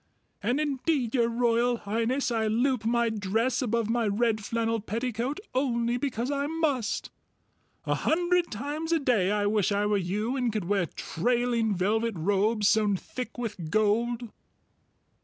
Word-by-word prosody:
And 250 Hz, +4 st, 0 dB
indeed, 280 Hz, -4 st, 0 dB
Your 235 Hz, -3 st, +3 dB
Royal 235 Hz, 0 st, +2 dB
Highness, 230 Hz, +6 st, -1 dB
I 225 Hz, -2 st, +1 dB
loop 240 Hz, +1 st, +1 dB
my 235 Hz, 0 st, +2 dB
dress 225 Hz, +4 st, 0 dB
above 230 Hz, -3 st, 0 dB
my 230 Hz, 0 st, +1 dB
red 215 Hz, +1 st, +1 dB
flannel 230 Hz, +1 st, -1 dB
petticoat 235 Hz, -, -2 dB
only 240 Hz, -3 st, +1 dB
because 245 Hz, -1 st, -2 dB
I 280 Hz, 0 st, -1 dB
must. 295 Hz, -8 st, -1 dB, 0.7 s
A -, -, +1 dB
hundred 350 Hz, +1 st, +1 dB
times 295 Hz, +9 st, -4 dB
a 335 Hz, -, +4 dB
day 245 Hz, -, +2 dB
I 205 Hz, 0 st, +1 dB
wish 205 Hz, -1 st, +2 dB
I 205 Hz, +1 st, +1 dB
were 210 Hz, 0 st, +2 dB
you 205 Hz, +7 st, -1 dB
and 250 Hz, -3 st, 0 dB
could 210 Hz, -4 st, -2 dB
wear 195 Hz, -2 st, +1 dB
trailing 235 Hz, +4 st, 0 dB
velvet 220 Hz, +4 st, 0 dB
robes 205 Hz, +5 st, +1 dB
sewn 210 Hz, -1 st, +3 dB
thick 250 Hz, +5 st, -7 dB
with 210 Hz, -9 st, -4 dB
gold!" 225 Hz, +4 st, +1 dB
230 Hz, 150 wpm, -28 LUFS, 210-250 Hz, 0.7 s, a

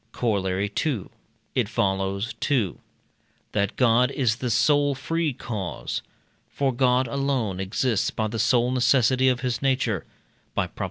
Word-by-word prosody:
Corollary 100 Hz, -3 st, 0 dB
II. 135 Hz, -, -2 dB, 0.4 s
It -, -, 0 dB
follows: 95 Hz, +3 st, -1 dB
2. 120 Hz, -, 0 dB, 0.7 s
That 100 Hz, -1 st, 0 dB
God 125 Hz, 0 st, +4 dB
is 125 Hz, -5 st, 0 dB
the 125 Hz, -2 st, -3 dB
sole 145 Hz, +5 st, +3 dB
free 165 Hz, +3 st, -1 dB
cause. 105 Hz, -8 st, -4 dB, 0.5 s
For 135 Hz, -2 st, 0 dB
God 125 Hz, 0 st, +2 dB
alone 130 Hz, -7 st, -1 dB
exists 105 Hz, +3 st, 0 dB
by 110 Hz, -, -2 dB
the 110 Hz, +1 st, -4 dB
sole 120 Hz, +2 st, +3 dB
necessity 130 Hz, 0 st, +3 dB
of 125 Hz, -1 st, 0 dB
his 125 Hz, -2 st, -2 dB
nature 130 Hz, -8 st, 0 dB, 0.5 s
(by -, -, +1 dB
Prop. -, -, -15 dB
120 Hz, 140 wpm, -25 LUFS, 105-130 Hz, 0.7 s, God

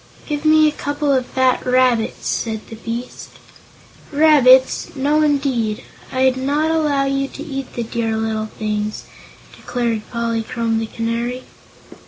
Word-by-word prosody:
"Give 295 Hz, 0 st, -4 dB
me 310 Hz, 0 st, +6 dB
a -, -, +2 dB
couple 290 Hz, -1 st, -1 dB
of 255 Hz, -2 st, 0 dB
fat 260 Hz, -1 st, +1 dB
rabbits," 250 Hz, -3 st, +1 dB
said 220 Hz, -2 st, -3 dB
the 225 Hz, -, -8 dB
beast. 230 Hz, +2 st, -7 dB, 0.7 s
"Rabbits! 280 Hz, -4 st, +5 dB
No, 290 Hz, +3 st, +2 dB
indeed. 270 Hz, -8 st, 0 dB, 0.3 s
I'd 260 Hz, 0 st, +2 dB
not 290 Hz, +4 st, 0 dB
allow 300 Hz, -4 st, +1 dB
you 275 Hz, 0 st, 0 dB
to 285 Hz, -, -9 dB
eat 275 Hz, -4 st, -6 dB
the 240 Hz, -, -2 dB
dear 225 Hz, -1 st, -2 dB
little 220 Hz, -1 st, -2 dB
things," 210 Hz, -1 st, -3 dB, 0.5 s
declared 235 Hz, -3 st, -2 dB
Polychrome 230 Hz, 0 st, -1 dB
the 225 Hz, -, -3 dB
Canary. 235 Hz, +3 st, -3 dB
255 Hz, 135 wpm, -19 LUFS, 230-280 Hz, 0.7 s, me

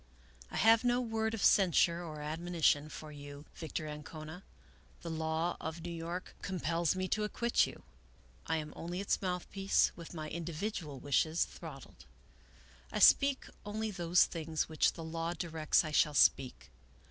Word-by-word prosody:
I -, -, -5 dB
have 225 Hz, +2 st, +5 dB
no 245 Hz, 0 st, +3 dB
word 225 Hz, -2 st, -1 dB
of 215 Hz, -, -4 dB
censure 175 Hz, -2 st, +4 dB
or 155 Hz, -3 st, -7 dB
admonition 155 Hz, -1 st, +1 dB
for 155 Hz, 0 st, -9 dB
you, 145 Hz, 0 st, -10 dB
Victor 160 Hz, -1 st, -5 dB
Ancona. 155 Hz, +3 st, -8 dB, 0.6 s
The 170 Hz, -, -4 dB
law 160 Hz, +2 st, -1 dB
of 160 Hz, +1 st, -5 dB
New 175 Hz, -, -5 dB
York 170 Hz, +2 st, -5 dB
compels 170 Hz, -2 st, 0 dB
me 185 Hz, 0 st, -1 dB
to 215 Hz, -, 0 dB
acquit 235 Hz, +3 st, +2 dB
you. -, -, -11 dB, 0.6 s
I 160 Hz, -, +1 dB
am 150 Hz, -1 st, -5 dB
only 175 Hz, +2 st, -5 dB
its 200 Hz, -, 0 dB
mouthpiece, 190 Hz, +1 st, +1 dB
with 170 Hz, 0 st, -10 dB
my 155 Hz, -1 st, -5 dB
individual 170 Hz, -2 st, -4 dB
wishes 155 Hz, +4 st, +1 dB
throttled. 135 Hz, -, -11 dB, 0.9 s
I -, -, -3 dB
speak 275 Hz, -1 st, +5 dB, 0.2 s
only 215 Hz, +1 st, -3 dB
those 175 Hz, -2 st, +4 dB
things 160 Hz, -2 st, -3 dB
which 160 Hz, -1 st, +2 dB
the 165 Hz, -, -8 dB
law 165 Hz, +1 st, -3 dB
directs 160 Hz, -2 st, +1 dB
I 155 Hz, -, -4 dB
shall 150 Hz, 0 st, +3 dB
speak. 125 Hz, -, +3 dB
165 Hz, 155 wpm, -33 LUFS, 155-185 Hz, 0.9 s, have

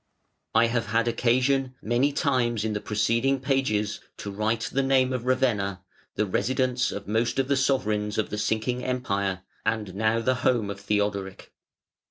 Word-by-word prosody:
I 115 Hz, -, +6 dB
have 115 Hz, -1 st, -1 dB
had 115 Hz, +2 st, +1 dB
occasion 130 Hz, +2 st, +1 dB
many 120 Hz, +6 st, +1 dB
times 120 Hz, -6 st, +1 dB
in 110 Hz, -, -1 dB
the 105 Hz, -, -3 dB
preceding 115 Hz, +6 st, +1 dB
pages 130 Hz, -6 st, 0 dB, 0.2 s
to 100 Hz, -, -6 dB
write 110 Hz, +3 st, -1 dB
the 135 Hz, -, 0 dB
name 130 Hz, -1 st, +2 dB
of 125 Hz, -1 st, -3 dB
Ravenna, 105 Hz, -8 st, +1 dB, 0.3 s
the 105 Hz, -, +1 dB
residence 125 Hz, +4 st, 0 dB
of 100 Hz, -, -6 dB
most 115 Hz, +3 st, 0 dB
of 135 Hz, -1 st, +1 dB
the 140 Hz, -, +2 dB
sovereigns 110 Hz, -6 st, 0 dB
of 110 Hz, -, -1 dB
the 105 Hz, -, -2 dB
sinking 110 Hz, +3 st, -1 dB
Empire, 100 Hz, -7 st, -1 dB, 0.2 s
and 110 Hz, -3 st, -1 dB
now 110 Hz, +3 st, +1 dB
the 130 Hz, +3 st, +2 dB
home 115 Hz, -5 st, +2 dB
of 100 Hz, -, -7 dB
Theodoric. 100 Hz, -2 st, -2 dB
115 Hz, 165 wpm, -26 LUFS, 105-130 Hz, 0.3 s, I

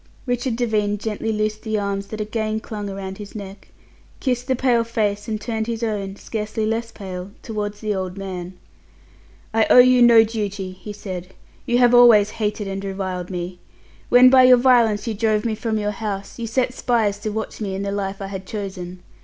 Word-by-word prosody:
Richard 245 Hz, -1 st, -1 dB
Devine 215 Hz, -3 st, 0 dB
gently 220 Hz, +1 st, -3 dB
loosed 215 Hz, 0 st, -1 dB
the 220 Hz, -2 st, -2 dB
arms 200 Hz, -1 st, -2 dB
that 215 Hz, -, -7 dB
again 215 Hz, 0 st, -2 dB
clung 210 Hz, -2 st, -6 dB
around 195 Hz, 0 st, -6 dB
his 205 Hz, 0 st, -9 dB
neck, 200 Hz, -1 st, -9 dB, 0.5 s
kissed 250 Hz, -2 st, -1 dB
the 260 Hz, -, +2 dB
pale 245 Hz, -2 st, +2 dB
face, 210 Hz, -3 st, -1 dB
and 215 Hz, -1 st, -2 dB
turned 220 Hz, -1 st, -3 dB
his 230 Hz, 0 st, -3 dB
own 200 Hz, -3 st, -2 dB
scarcely 215 Hz, +1 st, -3 dB
less 225 Hz, +1 st, -2 dB
pale 185 Hz, -3 st, -7 dB
towards 210 Hz, -2 st, -4 dB
the 215 Hz, -1 st, -1 dB
old 185 Hz, -1 st, -4 dB
man. 185 Hz, -2 st, -6 dB, 1.0 s
"I 225 Hz, -1 st, +3 dB
owe -, -, +7 dB
you 250 Hz, 0 st, +7 dB
no 235 Hz, -2 st, +8 dB
duty," 205 Hz, -4 st, -4 dB
he 185 Hz, +3 st, -9 dB
said. 190 Hz, -3 st, -7 dB, 0.3 s
"You 240 Hz, -1 st, +2 dB
have 245 Hz, -1 st, +5 dB
always 230 Hz, -4 st, +7 dB
hated 210 Hz, -1 st, -1 dB
and 195 Hz, 0 st, -4 dB
reviled 190 Hz, -2 st, -4 dB
me. 180 Hz, -1 st, -5 dB, 0.5 s
When 250 Hz, +1 st, +7 dB
by 260 Hz, -1 st, +7 dB
your 255 Hz, 0 st, +8 dB
violence 240 Hz, -4 st, +3 dB
you 230 Hz, -, -2 dB
drove 215 Hz, +1 st, 0 dB
me 225 Hz, -, 0 dB
from 220 Hz, 0 st, -2 dB
your 210 Hz, -1 st, -1 dB
house, 200 Hz, 0 st, -5 dB
you 230 Hz, -, -3 dB
set 250 Hz, +2 st, 0 dB
spies 220 Hz, -6 st, 0 dB
to 215 Hz, -, -3 dB
watch 220 Hz, +1 st, -5 dB
me 195 Hz, -2 st, -2 dB
in 195 Hz, -, -3 dB
the 200 Hz, -, -2 dB
life 200 Hz, 0 st, -3 dB
I -, -, -3 dB
had 195 Hz, -1 st, -7 dB
chosen. 185 Hz, -4 st, -6 dB
210 Hz, 195 wpm, -22 LUFS, 195-230 Hz, 1.0 s, no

